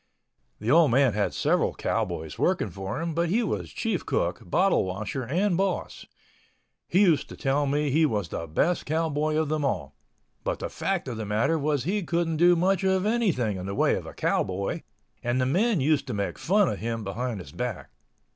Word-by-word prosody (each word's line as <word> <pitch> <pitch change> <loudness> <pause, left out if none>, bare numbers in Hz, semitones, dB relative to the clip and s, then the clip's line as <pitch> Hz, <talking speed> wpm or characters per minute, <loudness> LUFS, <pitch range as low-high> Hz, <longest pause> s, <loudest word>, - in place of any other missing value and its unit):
The 110 +4 -1
old 165 0 +6
man 130 -1 +4
had 105 -1 0
several - - +1
cowboys 80 -1 -2
working 175 - +1
for 95 +7 -5
him, 165 0 -2
but 170 +1 0
he 230 +7 +2
was 100 - -3
chief - - -2
cook, - - -1
bottle 190 - +2
washer 100 +7 -4
and 175 - +1
boss. 190 0 -2 0.8
He 185 - +3
used 170 -7 +3
to - - -10
tell 140 +1 +1
me 145 +1 +1
he 155 +3 +4
was 105 - -2
the 85 - -4
best 160 - 0
cowboy 155 -1 0
of 155 -1 +1
them 155 -1 0
all. 70 - -2 0.5
But - - -1
the - - -4
fact 195 -6 -2
of 120 -3 -4
the 110 - -4
matter 115 +10 +1
was 145 -3 0
he 200 +7 0
couldn't 170 -2 -1
do 175 +2 +6
much 185 +2 +1
of 190 0 +2
anything 180 - +1
in 90 +1 -6
the 100 - -3
way - - +3
of - - -3
a - - -8
cowboy, 95 +1 -1 0.4
and 120 +1 0
the 130 - +2
men 190 - +2
used 150 +1 +2
to - - -3
make 100 -1 -3
fun 200 +2 +3
of - - -2
him 115 0 -3
behind 115 +2 -3
his 75 -6 -10
back. 115 +3 -5
145 Hz, 205 wpm, -26 LUFS, 110-175 Hz, 0.8 s, old